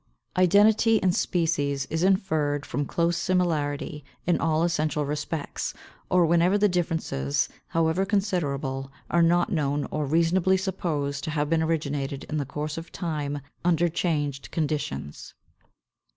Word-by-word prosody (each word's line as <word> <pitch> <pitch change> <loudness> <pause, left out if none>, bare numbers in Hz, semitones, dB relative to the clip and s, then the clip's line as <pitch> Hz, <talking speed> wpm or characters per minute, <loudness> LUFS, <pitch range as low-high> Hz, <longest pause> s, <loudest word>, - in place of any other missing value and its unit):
523. 185 - +3
Identity 210 +4 +5
in 185 - +5
species 145 -6 0
is 160 +1 0
inferred 155 -7 +1
from 145 -1 -2
close 170 0 +1
similarity 150 -5 -1 0.2
in 175 - +2
all 160 0 +2
essential 155 -3 0
respects, 150 +1 -3 0.3
or 180 -1 +4
whenever 170 +4 +3
the 210 0 +4
differences, 165 - 0 0.2
however 165 +3 +1
considerable, 145 -10 -1 0.2
are 170 - +4
not 175 +1 +3
known 145 -2 0
or 150 -2 -1
reasonably 170 +5 +3
supposed 155 -7 -2
to - - -3
have 150 0 -1
been 165 -1 +3
originated 145 -4 -2
in 155 - -1
the 140 -3 -2
course 150 +3 -4
of 165 - -11
time 150 -4 -3 0.2
under 175 -1 +3
changed 150 -5 -1
conditions. 145 - -3
160 Hz, 135 wpm, -26 LUFS, 145-175 Hz, 0.3 s, Identity